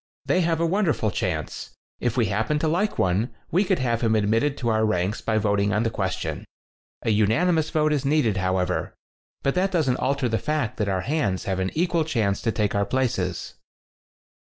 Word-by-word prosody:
They 185 - +2
have 165 -1 +1
a 170 - +2
wonderful 165 - +1
chance. 90 -9 -3 0.2
If 120 -1 -1
we 120 - +3
happen 110 +9 0
to 155 - 0
like 185 +7 0
one, 95 +7 0 0.2
we 185 +5 +3
could 190 -2 +1
have 120 -3 0
him 110 -2 +2
admitted 115 +7 +1
to 120 - -1
our 110 -1 +2
ranks 100 0 0
by 110 -1 0
voting" 100 -1 +1
on 105 +2 +1
the 115 - 0
ques - - -1
tion. - - -5 0.6
A 115 - +1
unanimous 155 - +2
vote 155 -1 +2
is 145 -2 0
needed, 135 -8 +2
however. 95 -1 -1 0.5
But 140 - +2
that 190 +2 +1
doesn't 150 -8 +1
alter 140 -1 0
the 115 -2 0
fact 150 -2 -2
that 105 -2 0
our 95 -1 0
hands 130 - -1
have 95 -1 -2
an 95 0 0
equal 170 0 +1
chance 110 -10 0
to 115 - 0
take 105 -2 0
our 100 - +2
places." 100 -6 -1
115 Hz, 195 wpm, -24 LUFS, 100-155 Hz, 0.6 s, we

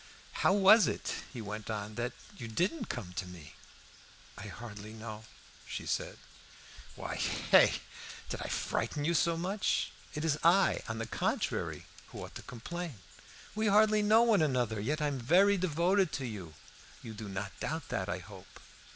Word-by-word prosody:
"How - - +5
was 205 +3 +7
it," - - -2 0.2
he 120 -5 -6
went 105 +1 -6
on, 105 -1 -3
"that 120 +3 -3 0.2
you 115 - -7
didn't 180 - -1
come 90 -3 -5
to 95 0 -4
me?" 85 -4 -11 0.8
"I 105 - -8
hardly 105 -1 -8
know," 110 -1 -8 0.4
she - - -5
said. - - -2 0.8
"Why, - - -5
hey? - - +4 0.6
Did - - -4
I - - -3
frighten 145 -1 -1
you 170 - +2
so 170 0 +2
much? 190 +4 0 0.2
It 150 +1 -2
is 155 -2 +1
I, 180 +4 +5
on 110 - -3
the 115 - -3
contrary, 115 - -2 0.2
who - - -8
ought - - -13
to - - -7
complain. 150 +4 -6 0.6
We 215 +1 0
hardly 215 +1 +5
know 215 +2 +6
one 225 -6 +4
another; 125 -7 +1
yet 150 +9 -1
I - - +2
am 140 -2 -2
very 185 +11 +5
devoted 185 +1 +2
to 135 - -2
you. 95 -9 -7 0.5
You 110 - -7
do 105 -1 -7
not 95 +1 -5
doubt 160 -1 -3
that, 95 - -2
I 90 - -1
hope?" 95 +1 -13
130 Hz, 170 wpm, -32 LUFS, 105-180 Hz, 0.8 s, was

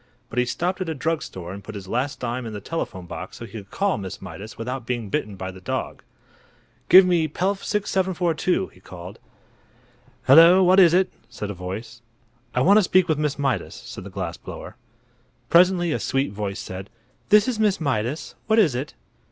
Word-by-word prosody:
But 125 - -1
he 125 - +3
stopped 180 +9 -2
at 180 - -2
a 160 - -2
drug 160 +3 -1
store 90 -1 -7
and 100 +1 -9
put 110 +1 -9
his 95 -2 -8
last 125 +7 -2
dime 120 0 -3
in 110 - -6
the 105 - -5
telephone 100 - -5
box 90 +1 -8
so 115 - -7
he 105 - -14
could 100 -4 -9
talk 200 -1 0
to - - -6
Miss 95 -1 -6
Mydas 105 +1 -9
without 125 +3 -4
being 120 -4 -2
bitten 105 0 -2
by 95 0 -5
the 95 0 -13
dog. - - -4 0.9
"Give 185 +1 +9
me 175 -3 +2
Pelf 190 +6 -1
6742!" 185 -3 0
he - - -21
called. 90 0 -10 1.1
"Hello! 165 +7 +8
What 185 +2 +6
is 175 -2 +7
it?" 185 0 +3 0.2
said 105 -1 -5
a - - -4
voice. 100 +6 -7 0.5
"I 125 - +2
want 195 +9 +6
to - - +3
speak 185 0 +3
with 155 -3 +1
Miss 150 -2 -1
Mydas," 135 -9 -1
said - - -9
the - - -8
glass - - -4
blower. - - -9 0.8
Presently 175 -1 +5
a - - 0
sweet 135 +1 0
voice 100 -1 -4
said: 95 +2 -7 0.4
"This 210 +2 +6
is 245 -4 -1
Miss 210 -3 +2
Mydas. 140 0 -2
What 220 0 +3
is 185 - +5
it?" 130 +5 -4
135 Hz, 200 wpm, -23 LUFS, -, 1.1 s, Give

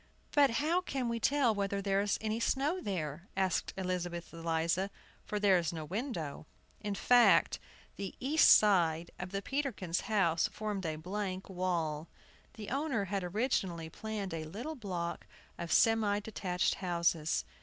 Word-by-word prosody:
"But 285 -2 +5
how 330 +5 +2
can 265 -8 -2
we 230 0 -1
tell 265 -1 +3
whether 200 -1 -1
there 195 0 +1
is 205 0 0
any 220 +1 -1
snow 285 +9 0
there?" 170 -3 -4
asked 190 -3 +1
Elizabeth 180 -2 -3
Eliza, 165 +3 0 0.4
"for 210 - -2
there 195 -3 +5
is 165 -2 -1
no 160 -2 -5
window." 170 - -4 0.3
In 205 -1 -3
fact, 245 +3 +5 0.4
the 195 -1 -5
east 295 +5 +5
side 170 -5 +5
of 180 - -4
the 195 +1 -3
Peterkins' 255 - -2
house 175 -6 +3
formed 205 -4 -4
a 155 - -2
blank 185 +3 -4
wall. 170 -4 -1 0.5
The 215 -2 -7
owner 270 -7 0
had 195 -2 0
originally 180 -5 -1
planned 210 -2 -4
a 160 -1 -4
little 225 - -5
block 185 - -4 0.3
of 170 -1 -4
semi 220 -2 +4
detached 190 -4 -1
houses. 170 - +1
195 Hz, 150 wpm, -33 LUFS, 170-220 Hz, 0.5 s, But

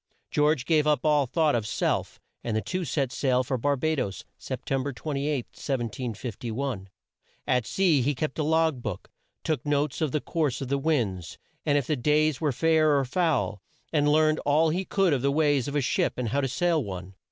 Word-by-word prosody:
George 150 -3 +2
gave 155 -2 +3
up 150 +1 +2
all 150 -3 +3
thought 155 +2 +2
of 110 -3 -1
self, - - -1 0.2
and 110 -2 -1
the - - 0
two 185 +7 -3
set 135 -4 -1
sail 130 -2 +1
for 130 +1 -2
Bar 140 +4 +1
ba 155 +4 0
does, 100 -7 -3
Sep - - -6
tem 135 -1 0
ber 140 +2 -3
28, 140 +1 -2
1751. 120 -2 -4 0.6
At 125 -4 +1
sea 170 -5 +3
he 140 +3 0
kept 155 +3 -3
a - - +2
log 160 -3 +2
book, 105 -6 -6 0.3
took 155 -6 -1
notes 145 0 0
of 155 -4 +1
the 150 - 0
course 145 -4 -1
of 135 - -5
the 140 0 +1
winds, 110 - -1 0.3
and 145 -1 +4
if 140 - 0
the 155 - 0
days 150 +3 +2
were 150 -3 +2
fair 155 +1 +3
or 135 - +1
foul, 145 - 0 0.3
and 150 -1 +3
learned 155 0 +3
all 155 +3 +3
he 185 +4 -1
could 195 -5 +2
of 135 - 0
the 140 +1 +2
ways 145 -3 +2
of 140 - -4
a 145 - +2
ship 125 - +1
and 125 -3 -2
how 140 +5 +1
to 135 - 0
sail 165 +3 +1
one. 95 -2 -7
140 Hz, 210 wpm, -27 LUFS, 125-155 Hz, 0.6 s, and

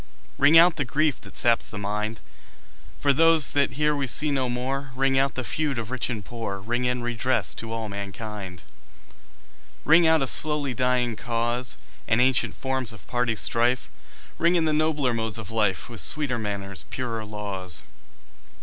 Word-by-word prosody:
Ring 145 +4 +6
out 170 0 +6
the 145 - 0
grief 150 +4 0
that - - -13
saps 115 -1 +2
the 105 - -7
mind, 105 +2 -3 0.8
For 140 -1 +2
those 165 0 +5
that 140 -1 +1
here 150 +1 +1
we 140 -2 -2
see 150 +5 +3
no 130 -3 0
more, 135 +3 -3
Ring 135 +1 +1
out 135 0 0
the 130 - -2
feud 145 0 -2
of 115 0 -5
rich 130 -1 -2
and 110 -6 -5
poor, 115 -5 -5
Ring 120 +5 -2
in 125 -1 -1
redress 120 +2 0
to 115 0 -8
all 115 -1 -3
mankind. 100 -2 -7 1.2
Ring 165 +2 +6
out 160 -3 +4
a - - +1
slowly 145 0 +2
dying 125 -1 0
cause, 120 +2 -1 0.3
And 110 - +2
ancient 130 0 +2
forms 130 -3 0
of 110 - -12
party 120 -2 -1
strife; 120 +3 +1 0.5
Ring 170 +2 +3
in 165 -2 +2
the 155 - +1
nobler 150 -4 +1
modes 110 -2 -1
of 110 -1 -7
life, 105 -4 0
With 120 -3 -6
sweeter 140 -6 -1
manners, 100 -3 -4
purer 115 -4 -4
laws. 100 -5 -3
125 Hz, 175 wpm, -25 LUFS, 110-140 Hz, 1.2 s, Ring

